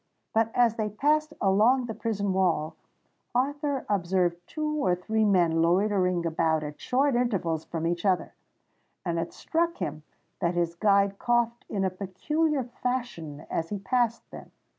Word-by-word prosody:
But 225 0 +3
as 235 -2 +3
they 215 -1 -1
passed 305 +8 +1
along 220 +7 +4
the 225 - -4
prison 205 -4 -1
wall, 175 -5 +1 0.6
Arthur 285 +1 0
observed 180 -3 +1
two 305 -1 -2
or 180 -1 +3
three 220 +5 0
men 175 -5 +3
loitering 180 0 +2
about 160 -1 +1
at 150 0 -7
short 275 +2 +2
intervals 195 -10 0
from 165 -1 -4
each 170 0 -1
other; 190 -3 +1 0.7
and 170 -1 0
it 165 - -3
struck 335 +1 -1
him 155 +1 -4 0.4
that 170 +1 0
his 170 -1 0
guide 200 +1 +2
coughed 240 -1 +1
in 195 -2 -1
a 190 - 0
peculiar 270 - -1
fashion 240 - -4
as 165 - -2
he 205 - -2
passed 235 +2 0
them. - - -10
200 Hz, 155 wpm, -27 LUFS, 175-245 Hz, 0.7 s, along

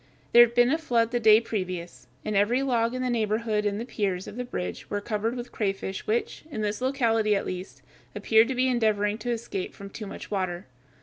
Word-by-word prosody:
There 240 - +10
had 235 0 -1
been 245 +1 +5
a 320 - +1
flood 235 -7 +1
the 240 - +1
day 220 -1 +7
previous, 185 - -5 0.2
and 215 - -2
every 230 +7 +3
log 235 -2 +1
in 255 - -2
the 255 - 0
neighborhood 215 -1 0
and 205 0 -2
the 230 - -4
piers 195 -6 -2
of - - -9
the 250 - -3
bridge 90 - -5
were 205 - -1
covered 215 +3 -2
with 245 0 -6
crayfish 195 -2 -3
which, 225 +3 -1
in 250 -8 -4
this 210 +2 -2
locality 230 -5 +2
at 195 - -1
least, 185 +1 -7 0.3
appeared 220 +1 +4
to 265 - -2
be 255 +1 +2
endeavoring 215 -3 +1
to 245 - -4
escape 225 -5 -3
from 200 0 -10
too 215 0 -7
much - - -9
water. 185 -3 -2
220 Hz, 220 wpm, -26 LUFS, 200-240 Hz, 0.3 s, There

